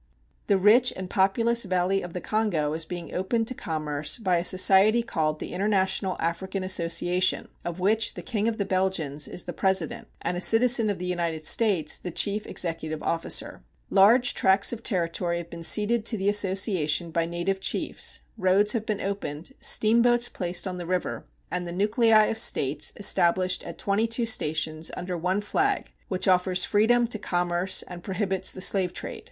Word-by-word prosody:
The 200 - +3
rich 225 +6 +5
and 185 -1 -7
populous 230 +5 +2
valley 185 0 0
of 175 -1 -8
the 180 - -5
Kongo 185 -9 -1
is 160 0 -3
being 175 0 -7
opened 225 +5 -1
to - - -3
commerce 155 - -2
by 185 -6 +1
a 170 - -1
society 195 +5 +4
called 155 -8 -1
the - - -6
International 190 -1 0
African 190 +3 -3
Association, 180 0 0
of 175 +1 -5
which 210 +4 +1
the - - -8
King 220 -2 -1
of 225 -1 -1
the 200 - -1
Belgians 185 -7 -1
is 180 - -5
the 175 - -5
president 190 0 -1
and 180 - -3
a 175 - -4
citizen 230 +1 +4
of 205 - -2
the 180 - -6
United 170 -3 -3
States 185 -6 +2
the 180 - -7
chief 205 +4 0
executive 160 -2 -3
officer. 165 - -2 0.3
Large 225 +6 +5
tracts 195 +4 +3
of 230 - -6
territory 170 -4 -1
have 170 0 -8
been 170 - -8
ceded 215 +6 +1
to 230 - 0
the 195 +1 0
association 190 -5 0
by 165 0 0
native 175 +3 -2
chiefs, - - -1 0.2
roads 200 +3 +3
have 220 -3 -3
been 210 -2 -2
opened, 195 - -5
steamboats 235 +2 +3
placed 175 0 -2
on 180 -1 -5
the 175 - -6
river, 180 0 -3 0.3
and 180 -1 -3
the - - -5
nuclei 215 +3 +3
of 225 - -1
states 140 +2 +1
established 185 -2 +2
at - - -8
twenty 205 +3 0
two 230 +1 -1
stations 155 -5 -1
under 180 0 -4
one 180 +4 -1
flag 395 - -1 0.2
which 185 0 -2
offers 185 0 +3
freedom 235 +3 +3
to 225 -2 -4
commerce 175 0 0
and 175 -1 -10
prohibits 190 0 -2
the 185 - -9
slave 185 -1 0
trade. - - -6
190 Hz, 180 wpm, -26 LUFS, 175-210 Hz, 0.3 s, rich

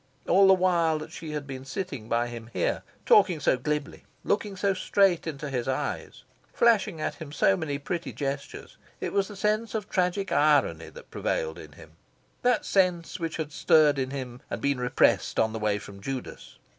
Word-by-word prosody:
All 195 +2 +6
the 190 - +7
while 170 -4 +2
that 155 - -8
she 160 - -8
had 150 -1 -4
been 130 -1 -7
sitting 135 - -5
by 120 +1 +1
him 115 -1 -8
here, - - 0 0.2
talking 210 - +5
so 140 - +3
glibly, 150 +3 -3 0.2
looking 205 -1 -1
so 200 +1 +1
straight 185 -2 +2
into 150 -1 -4
his 125 -2 -2
eyes, 130 - -3 0.3
flashing 220 -8 +3
at - - -2
him 150 -2 -7
so 100 -9 +3
many 145 +4 -3
pretty 165 +5 -4
gestures, 140 0 -5 0.2
it - - -4
was 200 -1 +1
the 210 - -10
sense 215 +3 0
of 210 -2 -3
tragic 185 +1 0
irony 145 0 +3
that - - -14
prevailed 485 -1 -2
in - - -12
him - - -15 0.5
that 245 -3 +2
sense 180 -4 +1
which 165 -2 -3
had 155 -2 -4
stirred 150 -2 +4
in 130 -1 -1
him, 130 -2 -6
and - - -3
been 140 -2 0
repressed, 125 0 +2
on 110 0 +2
the 110 - -4
way 105 -1 +1
from 100 -1 -11
Judas. 130 +2 -6
155 Hz, 190 wpm, -27 LUFS, 135-190 Hz, 0.5 s, the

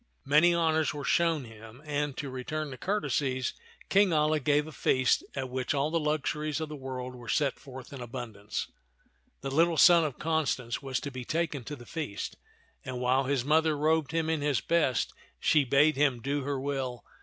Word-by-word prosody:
Many 150 +5 +5
honors 160 -3 +1
were 145 - -5
shown 165 0 +2
him, 115 +1 -12
and 145 -2 -2
to 140 -3 -4
return 150 +4 -4
the 130 - -7
courtesies 140 -10 -1 0.3
King 200 -1 +4
Alia 155 0 +2
gave 145 +2 +2
a 155 - -9
feast 130 -3 +2
at 130 -2 -3
which 130 +2 -1
all 140 +2 0
the 165 - +1
luxuries 150 0 -1
of 155 -1 -4
all - - -5
the 135 - -12
world 130 -1 -5
were 120 -2 -10
set 140 +2 +1
forth 130 0 -10
in 135 - -7
abundance. 115 -4 -5 0.7
The 135 - -4
little 165 +3 +3
son 175 -1 +7
of 150 -5 -3
Constance 145 -7 -1
was 135 -3 -2
to 140 - -5
be 130 -1 -6
taken 155 -1 -2
to 145 - -5
the 120 -3 -13
feast, 150 -11 -5 0.5
and 130 -1 -5
while 130 +2 +2
his 135 -2 0
mother 155 +1 +3
robed 155 0 +1
him 165 -1 0
in 160 -2 0
his 145 -2 +1
best, 160 -7 +1 0.3
she 150 -2 +4
bade 140 +3 +4
him 135 -4 +2
do 140 +4 -1
her 140 -1 -1
will. 130 -3 -3
145 Hz, 195 wpm, -29 LUFS, 130-155 Hz, 0.7 s, son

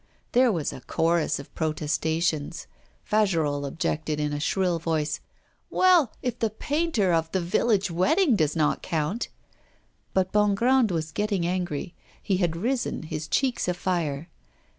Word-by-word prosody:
There 250 0 +4
was 165 -7 -2
a - - -9
chorus 165 -1 +1
of 140 - -10
protestations; 160 0 -1 0.4
Fagerolles 160 -9 +1
objected, 155 +1 -2
in 150 -1 -1
a 145 - -2
shrill 180 +2 +1
voice: 155 -2 -1 0.5
'Well, 360 -9 +4
if 245 -2 -2
the 225 - +1
painter 245 - 0
of 165 0 +1
"The 190 - +2
Village 195 +2 +1
Wedding" 240 - +3
does 155 -6 +1
not 155 -2 +1
count 165 +8 -2 0.5
' - - -40
But 190 -1 +2
Bongrand 215 +4 +3
was 160 -3 -2
getting 205 -1 -1
angry; 175 -2 -2 0.3
he 195 - 0
had 175 -3 0
risen, 240 +3 -1
his 155 0 -5
cheeks 250 - 0
afire. 170 -4 -1
175 Hz, 140 wpm, -26 LUFS, 155-215 Hz, 0.5 s, There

